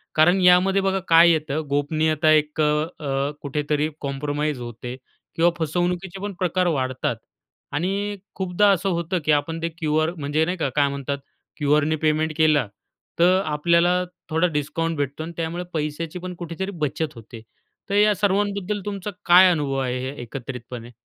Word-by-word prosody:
कारण 175 +5 +5
यामध्ये 185 +2 +5
बघा 195 0 +1
काय 165 +1 +7
येतं 155 -1 -1
गोपनीयता 155 +2 +1
एक 155 0 +2
अ, - - +4 0.4
अ, 140 -1 -1
कुठेतरी 150 +1 -1
कॉम्प्रोमाईज 145 +1 -2
होते 120 +1 -7 0.4
किंवा 170 +1 +4
फसवणुकीचे 175 +4 -2
पण 205 0 -4
प्रकार 180 0 +1
वाढतात. 130 -6 -1 0.6
आणि 200 +6 -1 0.2
खूपदा 190 +2 +2
असं 195 0 +1
होतं, 170 +1 -1
की 155 - +3
आपण 160 +3 0
ते 165 - -1
क्यू-आर 155 -1 0
म्हणजे 150 +1 0
नाही 180 +2 -2
का 160 - -1
काय 145 -1 +4
म्हणतात? 140 0 -3 0.4
क्यू-आरने 150 +1 +2
पेमेंट 155 0 0
केलं. 155 -6 +3 0.5
तर, 180 +2 +5
आपल्याला 170 +4 +2 0.3
थोडा 165 +3 +2
डिस्काउंट 160 +1 -2
भेटतो 145 +2 -3
आणि 165 - -6
त्यामुळे 170 +2 -3
पैशाची 155 +2 -3
पण 180 0 -6
कुठेतरी 175 +3 -5
बचत 150 +1 -1
होते. 115 0 -11 0.5
तर 200 - 0
या 210 +1 +5
सर्वांबद्दल 200 +1 0
तुमचा 205 0 -4
काय 180 +1 +8
अनुभव 145 -5 -1
आहे 130 +1 -2
एकत्रितपणे? 120 -1 -8
160 Hz, 150 wpm, -23 LUFS, 145-180 Hz, 0.6 s, काय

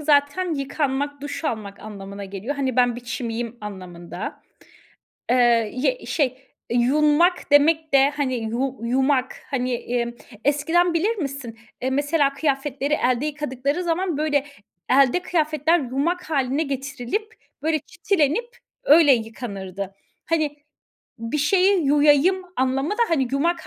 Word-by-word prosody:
zaten 300 +4 +2
yıkanmak, 280 0 -2
duş 290 +3 -5
almak 210 -7 -4
anlamına 200 -1 -8
geliyor. 200 +8 -5
Hani, 260 -3 -1
ben 245 -1 +3
bir - - -7
çimiyim 235 -1 -4
anlamında. 185 -4 -7 0.9
Eee, 240 -3 +4
y 400 - -1
şey, 290 -4 +2 0.4
eee, 240 - +1
yunmak 300 +8 +3
demek 310 +2 +4
de, 275 +1 +6
hani, 285 -3 -1
yu 240 +4 -2
yumak 260 +2 +1 0.2
hani, 255 -2 -1
emm, 235 0 -2 0.3
eskiden 325 +5 +2
bilir 415 +8 +1
misin, 275 - -5 0.2
eee, 260 - 0
mesela 285 +1 +2
kıyafetleri 280 0 -1
elde 255 0 +1
yıkadıkları 290 +2 -2
zaman 345 -1 0
böyle 295 -2 +1 0.5
elde 275 +6 +4
kıyafetler 315 -1 +1
yumak 310 +7 -2
hâline 275 0 +1
getirilip 280 - -4 0.3
böyle 315 0 +1
çitilenip 395 - 0 0.3
öyle 295 -1 +7
yıkanırdı. 200 -5 -4 0.3
Hani, 310 -3 0 0.6
bir 230 +6 -3
şeyi 370 +2 +3
yuyayım 295 +6 +4
anlamı 265 +4 0
da, 455 +3 +1
hani, 275 -7 +1
yumak 335 +5 0
280 Hz, 125 wpm, -23 LUFS, 245-310 Hz, 0.9 s, öyle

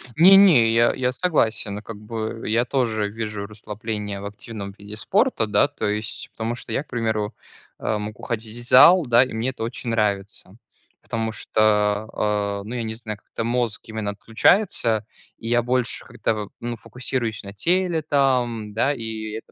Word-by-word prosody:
Не 180 +5 +8
не, 140 - +6
я 115 +1 +4
я 125 -1 0
согласен 115 - 0
как 115 -1 -9
бы. 110 +1 -5
Я 115 +3 +2
тоже 110 -6 0
вижу 105 -2 -5
расслабление 105 -1 -5
в - - -7
активном 100 0 -7
виде 105 +1 -9
спорта, 190 - +1
да, 105 +7 +4
то 145 -7 -4
есть, 105 +1 -3
потому 115 +1 -3
что - - -9
я, 140 - -1
к - - -36
примеру, 110 -3 -1 0.5
э, 110 - -1
мог 105 0 -6
уходить 115 -1 -5
в 120 - -6
зал, 170 +5 +8
да, 120 +1 +6
и 130 - -6
мне 115 +4 -1
это 125 - -5
очень 120 +1 -4
нравится. 100 -3 -1 0.5
Потому 110 -1 -3
что, 105 -1 +1
а, 100 -1 -1
ну, 115 +4 -6
я 120 - -2
не 110 0 -4
знаю, 110 -2 -6
как-то 115 - -6
мозг 120 -1 -1
именно 110 -2 -3
отключается, 115 - +2 0.3
и 115 - -6
я 120 0 +3
больше 125 -2 -1
как-то, 105 -2 -2
ну, 120 0 -3
фокусируюсь 125 -4 -4
на 100 - -8
теле, 175 - +1
там, 125 -7 +1
да, 135 +6 +2
и 110 -3 -5
это 110 +1 -8
110 Hz, 175 wpm, -23 LUFS, 105-125 Hz, 0.5 s, Не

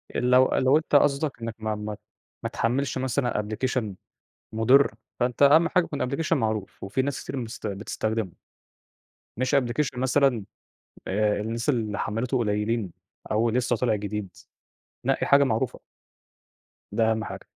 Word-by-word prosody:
آآ، - - +1
لو 125 +1 +5
لو 130 +3 +4
انت 155 -2 -1
قصدك 140 -2 +2
إنّك 115 -1 -4
ما 110 -1 -2
ما 105 0 -5 0.5
ما - - -1
تحمِّلش 130 +4 -1
مثلًا 130 -3 0
application 110 0 -2 0.6
مُضِر، 125 +6 +4 0.3
فأنت 125 +2 0
أهَم 155 +4 +6
حاجة 180 -2 +3
يكون 145 -5 -3
application 155 +3 -2
معروف 110 -8 -1
وفي 100 +7 -1
ناس 140 0 -3
كتير - - -5
مست 115 -3 -5
بتستخدمه. 105 0 -3 1.1
مش 130 +3 +1
application 130 +1 0
مثلًا 130 -3 +2 0.6
آآ، 105 +1 +1
الناس 115 +4 -3
اللي 110 -6 0
حمِّلته 115 +5 -1
قليّلين 105 -2 -1 0.4
أو 110 +2 +2
لسّه 120 0 +1
طالع 115 -1 +1
جديد، 105 -3 -4 0.7
نقي - - +1
حاجة 140 0 +6
معروفة. 120 -1 -1 1.1
ده 110 -1 +2
أهَم 110 0 -1
حاجة. - - -8
120 Hz, 145 wpm, -26 LUFS, 110-135 Hz, 1.1 s, أهَم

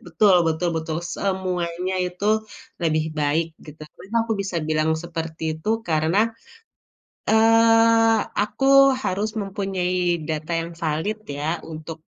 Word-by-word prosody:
Betul 190 +3 +4
betul 160 +2 0
betul 160 0 -3 0.2
semuanya 185 -2 -2
itu 180 +3 -7 0.6
lebih 155 -1 +1
baik 150 +3 +1 0.2
gitu 150 +1 -12
kan. 150 - -18
Kenapa 225 +4 -2
aku 225 - -2
bisa 190 -3 -4
bilang 155 0 +1
seperti 165 -1 -6 0.2
itu 210 - -6 0.2
karena, 160 +4 +1 1.1
eee, 225 0 +5 0.2
aku 240 +6 -1 0.4
harus 200 +4 -1
mempunyai 195 -2 -2 0.3
data 155 +1 -3
yang 170 +1 -6
valid 160 +8 -1 0.2
ya 150 - -3 0.3
untuk 160 +1 -8
180 Hz, 125 wpm, -23 LUFS, 160-205 Hz, 1.1 s, eee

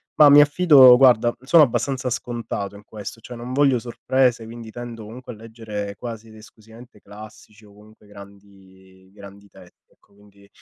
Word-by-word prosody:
Ma 150 -1 +6
mi 145 +1 +7
affido 145 -4 +6
guarda, 120 -3 +3
sono 155 +4 +4
abbastanza 130 +1 -2
scontato 115 -4 -6
in 100 - -15
questo, 110 +2 -11
cioè, 125 - -12
non 120 +2 -9
voglio 135 -3 +1
sorprese, 125 0 -2
quindi 115 0 -11
tendo 115 -1 -10
comunque 125 +3 -11
a - - -14
leggere 110 -3 -8
quasi 115 -2 -9
ed 110 - -17
esclusivamente 110 +1 -18
classici 105 +1 -16
o 100 - -20
comunque 105 +1 -21
grandi 95 -2 -19
grandi 100 0 -15
testi, - - -21
ecco, - - -33
quindi 100 -1 -23
110 Hz, 165 wpm, -21 LUFS, 105-125 Hz, -, mi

